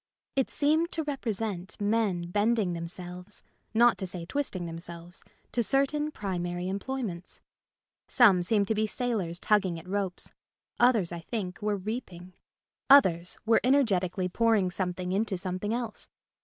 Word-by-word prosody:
It 270 -2 +1
seemed 315 +4 +2
to 320 - -1
represent 220 - -3
men 205 -5 0
bend 215 +4 +2
ing 190 -5 0
themselves 180 +3 -6 0.3
(not 235 +1 +4
to 190 - -2
say 175 -1 -5
twisting 195 -6 -2
them 165 0 -6
selves) 170 +1 -7 0.3
to 240 - +1
certain 280 +5 +2
primary 180 -7 -3
employments. 195 -2 -4 0.7
Some 205 -8 +6
seemed 200 +2 +2
to - - +3
be 215 0 +1
sailors 215 -8 -1
tugging 190 -3 +2
at 165 +2 -11
ropes; 195 -2 -2 0.5
others, 230 -8 +4
I 170 - -4
think, 185 +1 -5
were 210 -1 0
reaping; 185 -4 -6 0.6
others 180 -11 +6
were 225 0 +4
energetically 195 -9 +2
pouring 210 -1 +2
some 180 -1 -2
thing 180 0 -4
into 200 0 0
something 185 +3 -3
else. 235 -2 -3
200 Hz, 145 wpm, -29 LUFS, 180-230 Hz, 0.7 s, Some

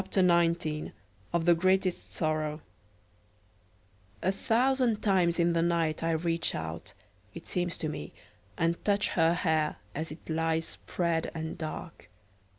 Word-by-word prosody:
] - - -8
OF 165 - 0
THE 175 - +7
GREATEST 185 +1 +1
SORROW 155 -1 -1 1.6
A 190 - +3
thousand 245 +2 +2
times 180 -4 +3
in 170 0 +3
the 165 - +2
night 165 -2 +1
I 165 - 0
reach 165 +1 0
out 80 0 -5 0.4
(it - - -8
seems 175 -1 -1
to 155 - -2
me), 150 - -5 0.5
and 165 +1 0
touch 205 -1 +2
her 165 0 +3
hair 160 -3 +1 0.2
as 160 +2 -4
it 155 - -11
lies 160 0 0
spread 170 -2 -2
and 160 0 -4
dark. 155 - -7
165 Hz, 135 wpm, -30 LUFS, 155-180 Hz, 1.6 s, THE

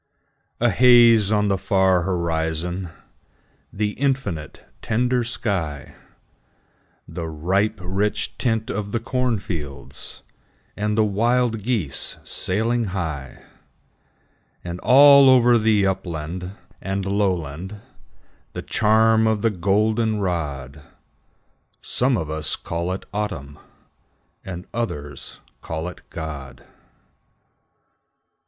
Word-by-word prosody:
A - - +3
haze 120 -4 +6
on 105 -1 +2
the 100 -2 +1
far 95 -2 +3
horizon, 85 0 -2 0.8
The 105 0 -1
infinite, 125 - -3 0.2
tender 125 +2 +1
sky, 90 - -3 1.1
The 85 - -5
ripe, 95 +8 0
rich 100 +3 -1
tint 115 -3 0
of 100 0 -4
the 115 - +1
cornfields, 100 - -4 0.5
And 105 +1 -1
the 110 - +5
wild 115 +2 +1
geese 105 - -2
sailing 115 +5 -1
high, 80 -9 -5 1.2
And 85 0 -5
all 140 +2 +8
over 120 -2 +6
the 110 -2 +3
upland 90 0 -3 0.3
and 95 0 -3
lowland 95 -1 -2 0.7
The - - -5
charm 110 +1 +3
of 110 -2 0
the 115 - +3
goldenrod, 95 - -1 1.0
Some 125 -1 +1
of 80 - -3
us 80 -2 -1
call 85 +2 -4
it 95 - -6
Autumn, 75 -9 -4 0.8
And 90 -1 -7
others 75 -12 -5 0.2
call 80 +1 -4
it 90 - -9
God. 70 -6 -7
100 Hz, 95 wpm, -22 LUFS, 85-110 Hz, 1.2 s, all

